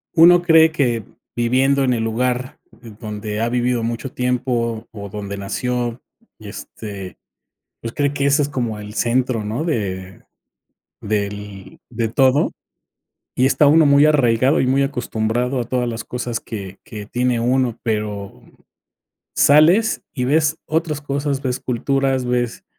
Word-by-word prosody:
uno 175 +1 +7
cree 160 -2 +5
que 120 -7 0 0.3
viviendo 130 +4 +2
en 125 - +2
el 115 -2 -1
lugar 125 +3 -2 0.4
donde 105 -1 -5
ha 115 +1 0
vivido 120 -1 0
mucho 120 +3 -3
tiempo, 120 -2 -1
o 100 -2 -8
donde 100 0 -6
nació 120 +4 -3 0.4
y - - -9
este, 100 -4 -8 0.6
pues 115 0 -6
cree 145 -1 0
que 140 -1 -1
ese 140 +2 +3
es 145 - -1
como 120 -6 -3
el 105 0 -9
centro, 120 0 0
¿no?, 110 +8 -3
de, 95 - -3 0.8
del 100 -1 -4
de 115 -2 -2
todo, 130 +4 +3 0.8
y 130 - +3
está 145 +2 +4
uno 155 +2 +6
muy 140 +1 +6
arraigado 130 -3 +3
y 130 - +1
muy 135 +2 +3
acostumbrado 125 -1 -1
a - - 0
todas 125 0 -1
las 115 -1 -5
cosas 120 -2 -4
que 100 -4 -8
que 105 -2 -8
tiene 125 +2 0
uno, 125 0 0
pero 105 -3 -3 0.9
sales 170 +10 +4
y 125 - -2
ves 155 +3 +2
otras 155 -2 -1
cosas, 140 -1 -2
ves 125 -1 -1
culturas, 135 +1 0
ves, 125 -1 -1
125 Hz, 145 wpm, -20 LUFS, 110-140 Hz, 0.9 s, uno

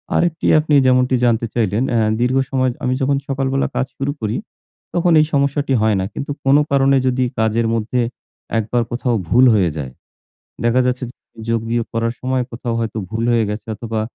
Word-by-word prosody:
আরেকটি 170 -2 0
আপনি 155 0 -1
যেমনটি 130 0 +3
জানতে 115 -1 +2
চাইলেন 110 0 0
অ্যা 115 -2 +2
দীর্ঘ 125 +2 +2
সময় 130 -1 +1
আমি 125 - +1
যখন 140 +1 +2
সকালবেলা 135 0 0
কাজ 130 - +1
শুরু 140 +1 -1
করি 110 -1 -1 0.6
তখন 175 0 +2
এই 155 - +4
সমস্যাটি 140 0 +1
হয় 110 -1 +3
নাই, 95 - -1
কিন্তু 140 - -5
কোনো 140 +2 +5
কারণে 135 0 +4
যদি 130 0 +1 0.2
কাজের 110 +1 +1
মধ্যে 115 +2 0 0.6
একবার 115 +2 0
কোথাও 120 0 0
ভুল 125 +2 +5
হয়ে 95 -5 +3
যায় 65 -4 -5 0.7
দেখা 120 +2 +3
যাচ্ছে 125 +1 -1
যে - - -18 0.4
যোগ 115 0 +1
বিয়োগ 120 -1 0
করার 115 0 0
সময় 130 0 0
কোথাও 115 0 -3
হয়তো 115 -1 -3
ভুল 115 +1 -2
হয়ে 115 -1 +3
গেছে 105 +1 -6
অথবা 110 0 -4
125 Hz, 180 wpm, -19 LUFS, 115-135 Hz, 0.7 s, কোনো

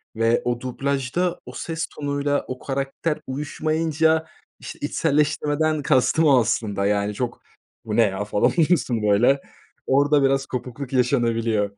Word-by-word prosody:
ve 115 +1 +2
o 120 -1 0
dublajda 140 +6 -2
o - - -9
ses 165 0 -4
tonuyla 145 0 -2
o 130 0 -6
karakter 140 +3 -3
uyuşmayınca, 155 +3 0 0.3
işte, - - -9
içselleştirmeden 150 0 0
kastım 140 +3 +2
o 140 -4 +6
aslında, 110 -3 -1
yani, 105 0 0
çok 120 +2 -4 0.4
“Bu 110 -1 -3
ne 115 - +5
ya?” 100 0 -1
falan 105 0 +2
oluyorsun, 155 -9 +1
böyle. 120 +7 +3 0.5
Orada 145 +1 +3
biraz 135 0 +2
kopukluk 125 +1 -6
yaşanabiliyor. 115 -5 +1
135 Hz, 135 wpm, -23 LUFS, 115-150 Hz, 0.5 s, o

